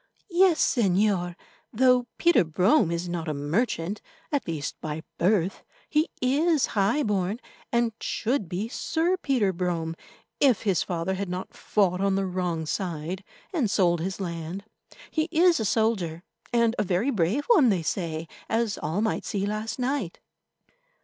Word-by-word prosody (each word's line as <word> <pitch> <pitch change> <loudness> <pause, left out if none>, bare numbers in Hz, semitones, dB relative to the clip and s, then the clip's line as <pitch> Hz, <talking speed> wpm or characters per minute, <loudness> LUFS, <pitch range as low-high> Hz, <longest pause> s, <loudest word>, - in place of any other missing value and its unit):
"Yes, 350 -1 +4
Señor. 190 -5 +2 0.4
Though 250 +1 +3
Peter 345 - +4
Brome 180 - +3
is 170 +1 -2
not 175 -1 -3
a 155 - -1
merchant, 165 - -1 0.3
at 285 -2 -1
least 155 -4 -4
by 155 0 -4 0.2
birth, 185 0 +1 0.3
he 310 +2 +2
is 290 +3 +2
high 215 +8 +2
born, 205 -1 0 0.3
and 235 -1 +2
should 225 -6 -1
be 190 +5 -2
Sir 330 +8 0
Peter 245 - +1
Brome 170 -2 -2 0.4
if 260 -7 +4
his 195 -6 +2
father 175 +1 -2
had 190 0 -3
not 180 +1 -5
fought 190 -3 +1
on 195 -1 +2
the 195 0 0
wrong 180 -3 -2
side 175 +1 -3 0.3
and 280 - +1
sold 175 -4 +2
his 190 +3 -3
land. 170 +1 -5 0.5
He 310 -1 +1
is 340 0 +4
a 220 - -1
soldier, 190 -7 0 0.3
and 235 -1 +3
a - - +3
very 195 +8 +1
brave 210 - 0
one, 340 - +5
they 185 -5 +1
say, 165 -2 -2 0.2
as 225 -2 0
all 175 +7 -1
might 220 - 0
see 200 -1 -2
last 215 +2 -3
night." 255 -8 -2
195 Hz, 155 wpm, -26 LUFS, 175-240 Hz, 0.5 s, one